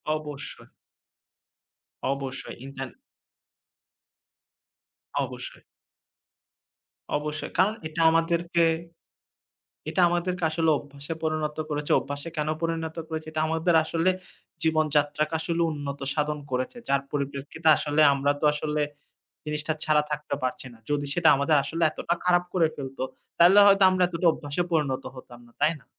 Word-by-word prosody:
অবশ্যই। 150 -2 -8 1.5
অবশ্যই, 135 -1 -6
ইন্টার 135 -1 -6 2.4
অবশ্যই। - - -9 1.5
অবশ্যই, 150 +1 -3
কারণ 195 +4 +4
এটা 160 +1 -3
আমাদেরকে, 170 +1 +2 1.3
এটা 185 - +1
আমাদেরকে 175 0 -1
আসলে 160 0 +1
অভ্যাসে 145 +2 -7
পরিণত 155 -1 -1
করেছে। 150 0 -2
অভ্যাসে 145 +3 -6
কেনো 155 +1 0
পরিণত 165 -1 -2
করেছে? 160 -1 -5
এটা 155 0 -1
আমাদের 165 +2 +1
আসলে 165 +3 +1 0.5
জীবনযাত্রাকে 155 -1 +1
আসলে 170 +1 -1
উন্নত 145 -1 -5
সাধন 150 0 -1
করেছে, 130 - -2
যার 140 0 +3
পরিপ্রেক্ষিতে 140 +3 -3
আসলে 150 +1 +1
আমরা 140 +1 +1
তো - - +2
আসলে 150 0 -1 0.6
জিনিসটা 150 +1 -2
ছাড়া 150 -1 +3
থাকতে 150 -1 -3
পারছি 130 +1 -3
না। 115 - -16
যদি 145 -1 0
সেটা 170 -2 +4
আমাদের 140 +2 +3
আসলে 165 +1 -3
এতটা 170 - -1
খারাপ 180 0 +3
করে 170 -4 +3
ফেলত 135 -1 -7 0.4
তাহলে 180 +4 +7
হয়তো 195 0 +6
আমরা 185 -1 +1
এতটা 175 0 -1
অভ্যাসে 145 +3 -3
পরিণত 145 -5 0
হতাম 120 -1 -12
না। 120 - -21
তাই 160 +2 +4
না? - - -24
155 Hz, 125 wpm, -26 LUFS, 145-165 Hz, 2.4 s, তাহলে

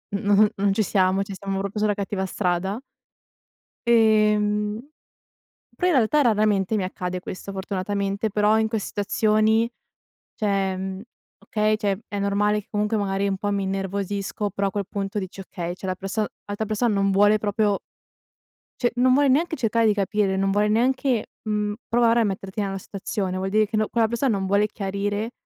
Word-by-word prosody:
n - - +2
n 210 +1 +6
non 200 0 +1
ci 215 - +1
siamo, 190 0 +2
cioè 200 - -8
stiamo 195 0 -4
proprio 200 +2 -3
sulla 210 0 +2
cattiva 200 -1 -3
strada. 190 +2 -1 1.1
Ehm. 210 -2 +3 1.0
Però 360 - 0
in 360 - +3
realtà 260 +4 +3
raramente 215 -4 +2
mi 200 - 0
accade 185 0 -4
questo, 185 +2 -7
fortunatamente, 200 +2 -2
però 210 +1 +3
in 220 - +2
que 220 0 -1
situazioni, 215 +3 +1 0.7
cioè, 195 -3 0
mhmm 190 0 -5 0.4
okay, 215 0 0
cioè, 200 -3 -1
è 205 - -5
normale 205 +1 +1
che 200 - -21
comunque 210 +1 0
magari 195 -1 0
un 195 - -1
po' 205 +1 -2
mi 200 -1 0
innervosisco, 195 +1 -2
però 200 +1 -1
a - - -4
quel 200 -1 -3
punto 195 +1 -3
dici: 190 0 -6
“Okay, 175 -2 -5
cioè, 190 - -8
la 185 - -1
perso 195 +3 -2 0.2
l'altra 205 +2 -4
persona 215 +2 +1
non 195 0 +2
vuole 205 +2 +4
proprio" 205 -1 +1 1.0
"cioè, 245 - +3
non 255 +1 +4
vuole 285 +2 +4
neanche 320 +5 +2
cercare 230 -3 +1
di 215 - +4
capire, 200 -1 0
non 195 0 +1
vuole 205 +2 +2
neanche, 245 +2 +1 0.2
mhmm, 210 -1 0
provare 235 0 +3
a - - +3
metterti 195 0 -3
nella 195 -1 -3
situazione. 190 -1 -4
Vuol 190 +1 -2
dire 215 +1 +3
che 215 - -2
no 215 0 +1
quella 230 -1 +2
persona 235 +1 0
non 190 -1 -2
vuole 200 +2 +3
chiarire", 205 +2 -3
205 Hz, 180 wpm, -24 LUFS, 195-215 Hz, 1.1 s, n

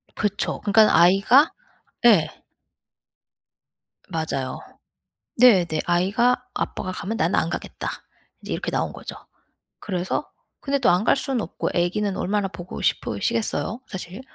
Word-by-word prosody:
그쵸. 205 -1 -2
그러니깐 210 +1 +5
아이가 195 - +5 0.5
예. 170 -10 +6 1.8
맞아요. 155 -6 -3 0.8
네네. 185 -10 +5
아이가 195 +8 +2 0.2
"아빠가 185 -1 -3
가면 220 +4 -4
나는 170 -1 +1
안 165 - 0
가겠다." - - -5 0.5
인제 - - -6
이렇게 - - -3
나온 - - -1
거죠. - - -9 0.6
그래서 185 +6 -3 0.3
근데 280 0 -1
또 255 - +3
안 180 +4 +2
갈 - - +4
수는 270 -3 -1
없고 165 - -4
애기는 190 +3 0
얼마나 200 0 -1
보고 180 -1 -8
싶으시겠어요, 230 -1 -1
사실? 190 +2 -8
195 Hz, 275 characters per minute, -23 LUFS, 175-225 Hz, 1.8 s, 예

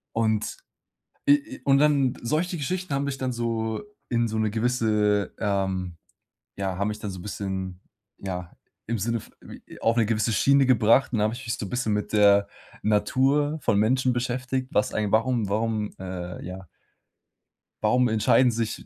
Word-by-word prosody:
Und 110 -1 0 0.7
i - - +10 0.2
i - - -15
und 135 0 +4
dann 140 -3 +3
solche 165 +8 -1
Geschichten 180 +3 -3
haben 140 +1 0
mich 140 -1 -3
dann 130 -1 -2
so 115 -2 -2 0.3
in 120 -1 +1
so 110 0 -3
'ne 110 -1 +1
gewisse, 110 -3 +1
ähm 95 -4 -1 0.6
ja, 95 -2 -2
haben 100 +1 0
mich 105 0 -4
dann 105 -1 -5
so 95 - -7
'n - - -9
bisschen, 95 -2 -4 0.4
ja, 90 -2 -5 0.3
im 115 +1 -2
Sinne 115 +3 -1
v - - -15 0.4
j - - -13
auf 115 +1 +2
'ne 115 -2 +3
gewisse 110 +1 +1
Schiene 140 +4 +4
gebracht, 120 +1 +4
und 115 - 0
dann 105 - +2
habe 110 +2 0
ich 130 +2 -9
mich 115 - -1
so 105 - -5
'n - - -9
bisschen 125 -3 -1
mit 105 - -3
der 100 -1 +5 0.3
Natur 135 +8 +2
von 100 - +2
Menschen 125 +4 +2
beschäftigt, 130 +1 -2
was 105 - +1
eigen 105 -2 -1
warum 115 -1 +2
warum, 110 0 -1
äh, 90 -2 -6
ja 90 0 -8 1.2
warum 125 0 +3
entscheiden 110 +3 +4
sich 115 -1 -3
110 Hz, 180 wpm, -25 LUFS, 105-125 Hz, 1.2 s, i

